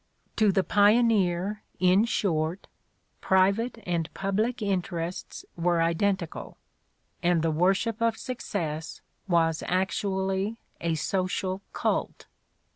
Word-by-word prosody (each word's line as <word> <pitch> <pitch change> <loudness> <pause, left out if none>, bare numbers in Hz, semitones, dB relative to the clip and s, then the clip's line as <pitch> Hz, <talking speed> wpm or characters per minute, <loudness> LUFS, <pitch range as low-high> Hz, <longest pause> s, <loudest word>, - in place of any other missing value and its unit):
To 215 -3 +4
the 190 0 +2
pioneer, 205 -2 +3 0.2
in 185 +4 +4
short, 170 -5 -1 0.6
private 200 +6 +2
and 170 -3 -1
public 215 +6 -1
interests 180 -4 -3
were 175 0 +1
identical 170 +1 -1 0.6
and 175 -2 +2
the 165 - +2
wor 180 +5 +3
ship 225 +2 -3
of 230 -1 +2
success 165 -11 -4 0.3
was 165 -3 +2
actually 190 +2 -1 0.2
a 170 -1 0
social 185 +3 -1
cult. - - -2
190 Hz, 105 wpm, -27 LUFS, 170-205 Hz, 0.6 s, To